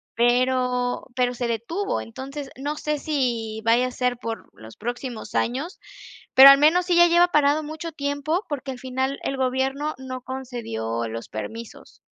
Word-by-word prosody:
pero 250 +1 +1
pero 250 -1 +1
se 245 0 -3
detuvo. 235 - -2
Entonces, 270 +4 -7
no 290 +3 -3
sé 300 -1 -2
si 240 -8 -2
vaya 235 +2 +4
a - - -6
ser 250 -1 -1
por 230 -1 -6
los 110 0 -14
próximos 240 +1 -6
años, 275 - -1 0.6
pero 270 +1 +12
al 275 - +9
menos 320 +5 +4
sí 355 -1 +2
ya 345 0 +7
lleva 345 +1 +5
parado 300 0 +3
mucho 315 +2 -6
tiempo, 285 +5 -2
porque, 280 -2 -4
al 255 - -8
final, 260 +1 -2
el 275 - -2
gobierno 265 +3 -1
no 255 -1 -7
concedió 225 - -4
los 115 +1 -7
permisos. 225 - -8
260 Hz, 165 wpm, -24 LUFS, 240-290 Hz, 0.6 s, pero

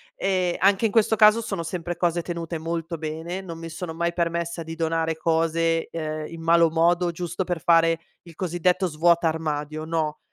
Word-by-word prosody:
Ehm, 185 -2 0
anche 195 +3 +3
in 215 - +1
questo 220 0 +3
caso 215 +1 +6
sono 195 -6 -4
sempre 175 0 -4
cose 175 -1 +1
tenute 170 -1 -5
molto 165 +1 -4
bene, 160 +4 -4
non 170 -4 -8
mi 165 0 -7
sono 160 +1 -6
mai 170 0 -1
permessa 170 0 -2
di 165 0 -7
donare 165 0 -1
cose, 165 0 +1
uhm, 155 -1 -4
in 165 0 -9
malo 165 0 +4
modo 170 +2 +2
giusto 175 +2 -3
per 175 -3 -3
fare 165 -1 +4 0.2
il 170 -2 -14
cosiddetto 180 +1 0
svuota 170 0 +3
armadio, 155 -1 -3
no. 160 -2 -2
165 Hz, 180 wpm, -24 LUFS, 160-175 Hz, 0.2 s, caso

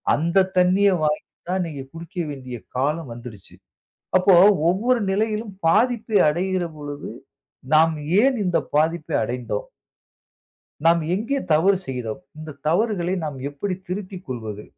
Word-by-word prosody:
அந்த 170 +5 +2
தண்ணீய 185 +3 +4
வாங்கி 150 0 +1 0.3
தான் 185 +1 0
இன்னக்கி 155 -6 -5
குடிக்க 165 +3 -10 0.2
வேண்டிய 130 -3 -7 0.2
காலம் 145 +1 -1
வந்துருச்சு. 115 -5 -11 0.6
அப்போ 185 +1 +4 0.4
ஒவ்வொரு 235 +7 +2
நிலையிலும் 215 +1 -1
பாதிப்பை 220 +3 +2
அடையிற 185 +3 -1
பொழுது, 145 -1 -7 0.6
நாம் 160 +1 +5 0.3
ஏன் 265 +1 +3
இந்த 180 -2 +2 0.2
பாதிப்பை 160 +1 +1
அடைந்தோம்? 120 -2 -4 1.2
"நாம் 170 0 +5
எங்கே 230 +8 -1
தவறு 190 +6 +4
செய்தோம்? 125 -4 -4 0.2
இந்த 155 -2 -9
தவறுகளை 180 0 +1
நாம் 145 -3 -5
எப்படி 185 +7 -3
திருத்திக் 185 0 -6
கொள்வது? 110 -5 -6
170 Hz, 120 wpm, -23 LUFS, 145-195 Hz, 1.2 s, நாம்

